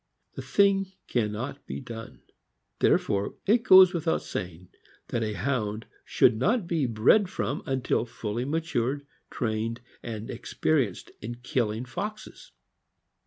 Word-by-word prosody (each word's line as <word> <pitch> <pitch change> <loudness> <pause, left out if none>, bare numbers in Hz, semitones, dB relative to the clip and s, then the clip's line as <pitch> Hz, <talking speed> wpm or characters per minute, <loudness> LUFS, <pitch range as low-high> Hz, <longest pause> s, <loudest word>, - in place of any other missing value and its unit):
The - - -6
thing 195 -1 +2
can 110 -4 0
not 130 +7 -6
be - - -4
done. 115 -3 -9 0.6
Therefore 100 0 +2
it 225 +4 +4
goes 185 -3 +8
without 165 -1 0
saying, 90 0 -6 0.4
that 120 - -1
a 110 -1 -1
Hound 110 0 -2 0.2
should 115 - +3
not 210 - +1
be 165 -6 0
bred 120 - +4
from - - -2
until 130 -3 0
fully 115 +1 -4
matured, 145 -2 -1 0.2
trained, 115 0 -2 0.2
and 110 -2 -6
experienced 120 - -1
in 120 +3 -5
killing 120 -2 -1
foxes. 210 - -7
125 Hz, 125 wpm, -27 LUFS, 110-165 Hz, 0.6 s, goes